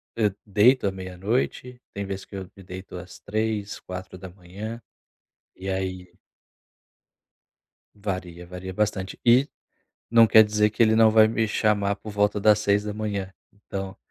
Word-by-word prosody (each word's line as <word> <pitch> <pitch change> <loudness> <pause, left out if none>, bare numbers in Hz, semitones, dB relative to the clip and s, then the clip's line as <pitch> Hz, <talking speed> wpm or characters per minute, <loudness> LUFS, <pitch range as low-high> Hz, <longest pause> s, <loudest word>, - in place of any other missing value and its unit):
hã, 105 -3 +2
deito 110 +5 +4
à 100 - +2
meia-noite, 100 +7 -3
tem 100 0 -4
vezes 95 0 -5
que - - -12
eu 95 -1 -6
me 100 - -13
deito 90 0 -9
às 90 0 -10
3h, 105 -1 -2
4h, 95 +4 -8 0.8
e 95 +1 -6
aí 95 -1 -3 1.9
varia. 90 -4 -5
Varia 90 +1 -7
bastante 95 -1 -2
e, 125 +4 +5 0.6
não 115 -1 +7
quer 110 0 +8
dizer 105 0 +2
que 110 - +1
ele 110 -1 +4
não 110 -1 +6
vai 110 0 +6
me 110 0 0
chamar 105 -2 +1
por 105 +1 -9
volta 105 0 +1
das 105 0 +5
6h, 105 -1 -1 0.2
Então, 95 -1 -7
100 Hz, 140 wpm, -25 LUFS, 95-110 Hz, 1.9 s, quer